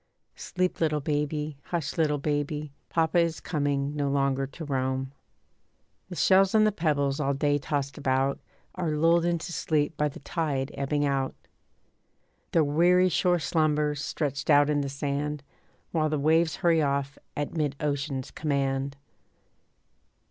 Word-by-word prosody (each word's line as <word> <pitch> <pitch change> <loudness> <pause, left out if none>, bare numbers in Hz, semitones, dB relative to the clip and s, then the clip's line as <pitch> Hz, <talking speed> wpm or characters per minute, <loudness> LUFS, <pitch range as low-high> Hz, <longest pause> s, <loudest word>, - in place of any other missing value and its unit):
Sleep 180 -1 -2
little 155 -2 +2
baby, 150 0 -2
hush 165 -5 -3
little 150 -2 +2
baby, 145 0 -2 0.2
Papa 165 +1 +2
is 165 -1 +1
coming, 145 -2 -1
no 145 -1 0
longer 135 -1 +1
to 160 +4 -8
roam. 130 -1 -1 1.0
The 180 - -6
shells 190 +3 +4
and 215 0 +6
the 215 - +3
pebbles 145 -6 0
all 140 -1 0
day 145 +1 +1
tossed 140 0 -3
about 135 +1 +1 0.3
Are 180 -3 -2
lulled 165 +2 +4
into 175 +1 -1
sleep 150 -1 0
by 150 - +2
the - - -11
tide 145 -3 -2
ebbing 145 +1 0
out. 135 -1 -1 1.2
The 165 - +4
weary 175 +5 +4
shore 180 +1 +2
slumbers, 150 -2 0
stretched 140 -2 -3
out 145 0 +5
in 145 -1 +1
the 140 - -3
sand, 145 +1 -3 0.5
While 155 -2 +1
the 155 - 0
waves 160 +3 +3
hurry 170 -4 +3
off 140 -1 -1 0.2
at 145 0 -2
mid 150 -4 -1
ocean's 140 -2 -2
command. 140 -2 -1
150 Hz, 145 wpm, -27 LUFS, 140-160 Hz, 1.2 s, and